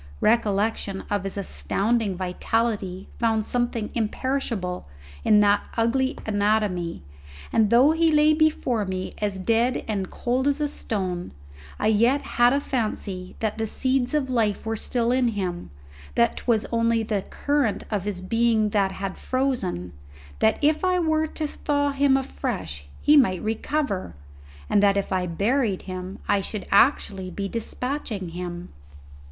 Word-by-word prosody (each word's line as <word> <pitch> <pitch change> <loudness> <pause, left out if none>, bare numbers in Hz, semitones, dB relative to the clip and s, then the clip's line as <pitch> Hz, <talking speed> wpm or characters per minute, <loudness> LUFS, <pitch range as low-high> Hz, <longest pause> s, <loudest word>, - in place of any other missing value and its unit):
Recollection 210 -2 +1
of 205 -2 0
his 195 - -4
astounding 200 - -1
vitality 190 +1 -1
found 225 -2 +1
something 240 -3 -1
imperishable 225 - -2 0.4
in 210 -1 +5
that 205 0 +4 0.2
ugly 260 +3 +1
anatomy, 205 - 0 0.5
and 220 -2 +4
though 250 +7 +6
he 325 0 +3
lay 300 0 +5
before 300 -8 +1
me 185 -1 -4
as 205 -2 -1
dead 230 +6 +1
and 195 -4 -2
cold 255 +3 -1
as 290 +1 +1
stone, 185 -5 -3 0.4
I - - -2
yet 235 +6 +3
had 240 0 +3
a 280 - +2
fancy 210 -8 -3
that 220 0 -1
the 220 - 0
seeds 260 +3 0
of 290 -3 +1
life 225 -6 0
were 225 0 -1
still 235 +2 0
in 255 -1 +3
him, 185 -6 -3 0.5
that 235 0 +3
'twas 225 -3 +1
only 230 -1 +2
the 210 -2 -1
current 285 0 -1
of 205 -4 -1
his 200 -3 -3
being 225 +2 +2
that 200 -2 +1
had 195 -1 -5
frozen, 240 - -1 0.5
that 110 - +3
if 305 +4 +3
I 365 0 +3
were 315 -2 +1
to 310 0 -4
thaw 285 -1 0
him 275 -1 +3
afresh 160 - -4 0.2
he 300 - +6
might 215 -11 +4
recover, 220 - -2 0.5
and 205 - +3
that 200 -1 +4
if 200 - -2
I 185 -1 0
buried 205 +4 0
him 185 0 -6
I 200 - +2
should 205 +1 -5
actually 200 -4 +3
be 195 +2 -4
despatching 230 - -3
him. 175 0 -6
220 Hz, 145 wpm, -24 LUFS, 195-255 Hz, 0.5 s, though